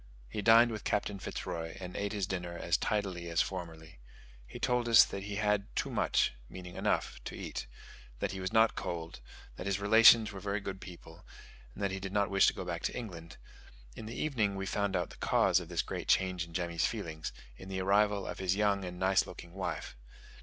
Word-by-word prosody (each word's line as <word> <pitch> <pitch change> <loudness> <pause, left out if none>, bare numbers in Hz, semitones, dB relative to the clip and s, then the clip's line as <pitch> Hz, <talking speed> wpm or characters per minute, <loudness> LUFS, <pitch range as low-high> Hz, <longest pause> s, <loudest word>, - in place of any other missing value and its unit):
He 105 - -4
dined 115 +2 +6
with 110 -2 -5
Captain 105 -1 -1
Fitz - - -5
Roy, 80 +2 -5
and 90 -1 -7
ate 100 0 -2
his 100 -3 -1
dinner 90 -2 -4
as 85 +1 +1
tidily 95 -5 -1
as 85 0 0
formerly. 80 -7 -8 0.5
He - - -9
told 125 -1 0
us 115 - +9
that 100 0 -6
he 100 0 -4
had 105 -1 +1
"too - - -1
much" - - +2 0.2
(meaning 90 -1 -9
enough) - - -1
to - - -6
eat, - - -5 0.5
that - - -2
he 95 - -5
was 95 0 -3
not 110 0 +5
cold, 85 -4 -5 0.4
that 90 - -5
his 100 0 0
relations 110 +1 +7
were 100 - -7
very 100 +2 -2
good 95 -2 -6
people, 85 -3 -12 0.5
and - - -5
that 100 - +1
he 95 - -3
did 95 0 -6
not 100 -1 +1
wish 100 0 +5
to - - +3
go 95 - -5
back 85 -1 -3
to - - -2
England: 85 -8 -8 0.6
in 110 - -8
the 115 - -6
evening 110 -10 0
we 95 0 -3
found 100 0 -1
out 90 -2 -1
the - - -13
cause - - +3
of - - -9
this - - 0
great - - -5
change 95 -2 +2
in 85 - -15
Jemmy's 85 -2 0
feelings, 85 -9 -5 0.2
in 95 +9 -11
the 95 -1 -3
arrival 100 +1 +2
of - - -6
his 95 -1 +1
young 100 -1 +1
and 90 -1 -6
nice 95 +1 +2
looking 85 -1 -10
wife. 95 -8 -4
95 Hz, 215 wpm, -32 LUFS, 90-105 Hz, 0.6 s, us